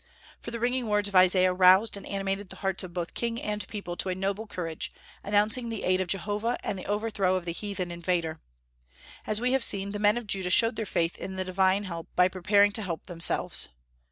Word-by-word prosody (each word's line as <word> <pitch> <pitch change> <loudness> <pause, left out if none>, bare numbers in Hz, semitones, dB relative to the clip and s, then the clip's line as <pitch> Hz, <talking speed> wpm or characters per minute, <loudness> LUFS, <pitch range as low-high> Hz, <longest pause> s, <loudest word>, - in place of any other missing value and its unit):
For - - -8
the 235 0 -5
ringing 245 +1 0
words 210 -1 +1
of 200 - -9
Isaiah 185 0 +5
roused 185 +4 +5
and 200 - -9
animated 195 0 -3
the - - -9
hearts 195 0 0
of 180 - -8
both 175 -1 -4
king 235 0 -2
and 210 -2 -4
people 200 -5 -6
to 190 - -3
a 185 - -1
noble 200 +3 -3
courage, 165 -5 -5 0.3
announcing 210 +4 +2
the 225 -2 -5
aid 185 0 +2
of 185 - -2
Jehovah 205 +5 -1
and - - -2
the - - -8
overthrow 205 -3 0
of 185 -2 -3
the 170 - -3
heathen 195 -2 -4
invader. 170 -2 -2 0.9
As 215 0 +1
we 250 +2 0
have 265 -2 +3
seen, 200 -2 +4
the 205 - -4
men 210 +2 +3
of 240 - -5
Judah 190 -3 -1
showed 230 +6 +4
their 220 - -3
faith 165 -1 -1
in 190 - -6
the 190 0 -3
divine 190 +2 +2
help 170 -4 -6
by 180 0 +5
preparing 200 +2 +3
to 220 - -1
help 175 -5 -5
themselves. 170 -2 +1
195 Hz, 220 wpm, -27 LUFS, 185-210 Hz, 0.9 s, Isaiah